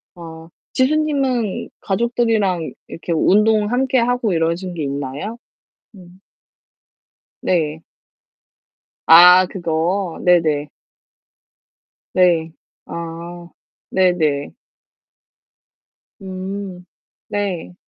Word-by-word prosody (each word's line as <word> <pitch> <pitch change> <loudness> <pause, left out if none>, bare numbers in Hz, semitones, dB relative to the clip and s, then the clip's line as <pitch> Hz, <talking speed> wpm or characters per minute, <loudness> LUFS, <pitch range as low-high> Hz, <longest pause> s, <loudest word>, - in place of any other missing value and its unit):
어 165 -1 -11 0.3
지수 260 +4 +2
님은 270 -9 -1
가족들이랑 215 -5 0 0.2
이렇게 170 - -7
운동 210 +5 +3
함께 260 +1 +1
하고 240 -3 0
이러신 170 +2 -1
게 160 - -4
있나요? 140 - -5 0.6
음. 180 0 -16 1.2
네. 160 -3 -1 1.2
아 180 +2 +8
그거. 170 +1 -2
네네. 155 -5 +2 1.4
네. 170 -3 +3 0.3
아. 170 +1 -8 0.4
네네. 165 -6 +1 1.7
음 190 -1 -6 0.4
네. 195 -4 -3
180 Hz, 130 characters per minute, -19 LUFS, 165-210 Hz, 1.7 s, 아